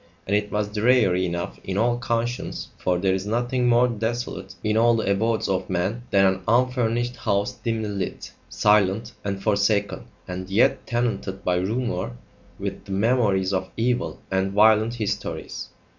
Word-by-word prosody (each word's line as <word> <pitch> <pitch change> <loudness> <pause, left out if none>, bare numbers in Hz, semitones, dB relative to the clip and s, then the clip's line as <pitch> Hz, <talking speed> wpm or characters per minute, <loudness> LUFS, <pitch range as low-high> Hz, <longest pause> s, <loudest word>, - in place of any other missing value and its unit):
And 100 - +1
it 105 0 -1
was 105 +1 -1
dreary 105 -5 +3
enough 85 0 -4
in 95 0 -3
all 120 +2 +2
conscience, 120 +1 -2
for 90 -1 +1
there 95 +1 +1
is 95 +1 -2
nothing 120 +3 0
more 120 +1 +5
desolate 120 +1 -4
in 105 0 +1
all 115 +1 +4
the 110 -3 0
abodes 110 +3 +1
of 95 -1 -1
men 95 +6 -1
than 95 -1 +4
an 95 0 +2
unfurnished 120 0 +1
house 100 -2 0
dimly 110 -2 -3
lit, 100 -2 -4 0.2
silent, 105 +2 +2
and 100 -1 -3
forsaken, 100 0 +1 0.2
and 95 +1 -5
yet 100 +5 +2
tenanted 120 -5 -2
by 90 -1 +1
rumour 95 - -2 0.4
with - - -5
the 100 - -9
memories 100 -3 +2
of 95 0 -1
evil 120 +2 0
and 95 0 0
violent 110 +2 +4
histories. 105 -3 -4
105 Hz, 160 wpm, -24 LUFS, 95-120 Hz, 0.4 s, more